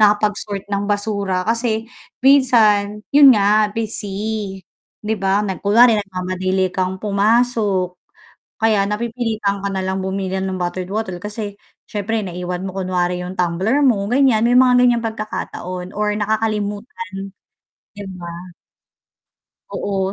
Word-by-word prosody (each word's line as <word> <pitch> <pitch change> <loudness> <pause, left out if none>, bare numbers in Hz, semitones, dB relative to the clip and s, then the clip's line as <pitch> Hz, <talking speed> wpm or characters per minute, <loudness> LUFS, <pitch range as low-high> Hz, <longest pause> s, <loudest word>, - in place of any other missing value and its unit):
nakapag-sort 205 -1 +1
ng 200 +1 -1
basura 200 -3 0
kasi 225 0 0 0.4
minsan 215 -6 +4
'yon 280 -4 +8
nga 210 +1 +3
busy, 210 -2 -2 0.4
'di 215 - 0
ba? 195 +2 +1 0.2
Kunwari 230 +4 +5
nagmamadali 185 -1 -2
kang 185 0 -1
pumasok 210 -2 +1 0.7
kaya 220 -3 +3
napipilitan 220 -1 -2
ka 200 - -1
nalang 190 0 -2
bumili 190 0 -2
ng 190 -1 -3
bottled 180 +1 -3
water 205 -4 -3
kasi 210 -1 -5 0.3
siyempre 215 +2 -2
naiwan 180 -1 -5
mo 190 - -8
kunwari 180 -1 -1
'yong 180 +1 -6
tumbler 185 +8 0
mo 230 -8 +3
ganyan 250 -4 +3
may 240 - +3
mga 255 -1 +5
ganyang 240 -1 +3
pagkakataon 185 -5 -5
or 210 0 +1
nakakalimutan 210 -1 -3 0.6
di 205 -1 -9
ba? 170 -1 -7 1.4
Oo, 195 -1 -2
205 Hz, 120 wpm, -19 LUFS, 190-220 Hz, 1.4 s, yon